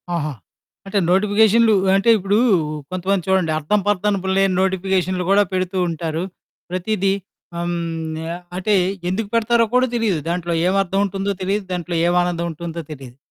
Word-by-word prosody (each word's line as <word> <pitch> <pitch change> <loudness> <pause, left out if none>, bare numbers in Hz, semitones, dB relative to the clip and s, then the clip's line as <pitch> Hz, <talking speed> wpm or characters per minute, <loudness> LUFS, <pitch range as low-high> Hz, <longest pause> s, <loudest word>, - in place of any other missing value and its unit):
ఆహా! 155 -3 -2 0.5
అంటే 200 +1 0
నోటిఫికేషన్లు 215 +3 +4 0.2
అంటే 195 +4 +2
ఇప్పుడు 200 +2 +1 0.5
కొంతమంది 185 +1 -1
చూడండి 190 -4 +2
అర్థం, 205 +8 +1
పర్దనుపు 200 -1 0
లేని 195 -2 +2
నోటిఫికేషన్లు 185 -1 0
కూడా 205 +1 +5
పెడుతూ 185 0 -1
ఉంటారు. 165 0 -3 0.5
ప్రతీదీ 195 +2 0 0.4
హ్మ్, 175 0 -2 0.6
ఆహ్, 175 - -10
అంటే 200 +3 0 0.4
ఎందుకు 200 +3 -2
పెడతారో 230 0 +3
కూడా 255 +1 +4
తెలీదు. 220 -7 +1
దాంట్లో 175 0 -2
ఏం 185 - +2
అర్థం 195 +2 -2
ఉంటుందో 195 +1 -2
తెలీదు. 195 +2 -1
దాంట్లో 175 -1 -3
ఎం 175 - +1
ఆనందం 175 -1 -1
ఉంటుందో 170 +1 -6
తెలీదు. 130 -4 -10
190 Hz, 145 wpm, -20 LUFS, 175-205 Hz, 0.6 s, కూడా